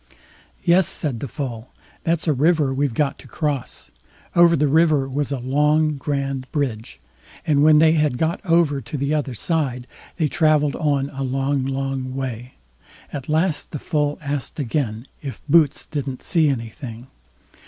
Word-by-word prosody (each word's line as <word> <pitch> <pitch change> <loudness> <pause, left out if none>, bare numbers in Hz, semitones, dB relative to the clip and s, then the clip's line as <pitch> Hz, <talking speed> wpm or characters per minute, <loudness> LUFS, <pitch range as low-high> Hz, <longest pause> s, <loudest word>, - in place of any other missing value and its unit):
"Yes", 180 0 +4
said 135 -7 -3
the 140 - -4
Foal, 120 -2 -5 0.3
"that's 165 +1 0
a 155 - +4
river 150 0 +2
we've 135 -3 -1
got 145 -2 0
to - - -13
cross." 145 -6 -3 0.4
Over 170 -1 +6
the 150 0 +2
river 155 -2 +3
was 140 +1 -2
a 140 - -1
long, 150 +4 +2
grand 135 -1 -3
bridge; 125 -7 -3 0.5
and 150 -4 +3
when 155 0 +6
they 160 +1 +6
had 150 -5 +1
got 160 +3 -1
over 165 -6 +2
to 120 +5 -6
the 140 +2 -1
other 145 -5 -1
side, 130 -3 -1 0.3
they 160 -3 +2
travelled 150 -1 +2
on 145 -3 0
a 135 -1 -6
long, 135 +1 0
long 135 -1 -3
way. 125 -2 -5 0.6
At 140 -1 -6
last 160 +1 +1
the - - -5
Foal 145 0 -1
asked 145 +1 -3
again: 120 -4 -2 0.2
"If 135 -3 -7
Boots 155 -1 +3
didn't 140 -3 -5
see 160 -4 +2
anything?" 115 -1 -5
145 Hz, 160 wpm, -22 LUFS, 130-155 Hz, 0.6 s, Over